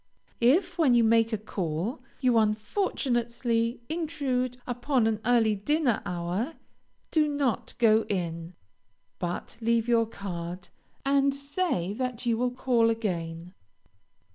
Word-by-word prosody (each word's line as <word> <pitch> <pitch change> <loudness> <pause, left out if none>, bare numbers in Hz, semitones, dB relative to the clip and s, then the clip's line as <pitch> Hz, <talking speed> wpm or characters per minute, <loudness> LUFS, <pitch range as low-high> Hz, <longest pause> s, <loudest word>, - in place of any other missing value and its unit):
If, 345 +10 +3
when 275 -7 +5
you 235 - +5
make 225 0 +4
a 220 - 0
call, 195 - -3 0.2
you 250 -3 +3
unfortunately 235 - 0
intrude 280 -7 -1
upon 245 0 0
an 220 -1 +1
early 225 -3 +4
dinner 265 +3 +1
hour, 180 - -2 0.6
do 310 -2 +3
not 285 -7 -1
go 225 -2 +5
in, 170 -2 -3 0.6
but 175 +6 -4
leave 230 0 +2
your 230 -2 +3
card, 180 -3 -6 0.4
and 275 0 +3
say 280 - -1
that 250 +1 -3
you 235 -1 +2
will 250 +2 +1
call 245 -2 +2
again. 175 -6 -3
230 Hz, 120 wpm, -28 LUFS, 205-260 Hz, 0.6 s, when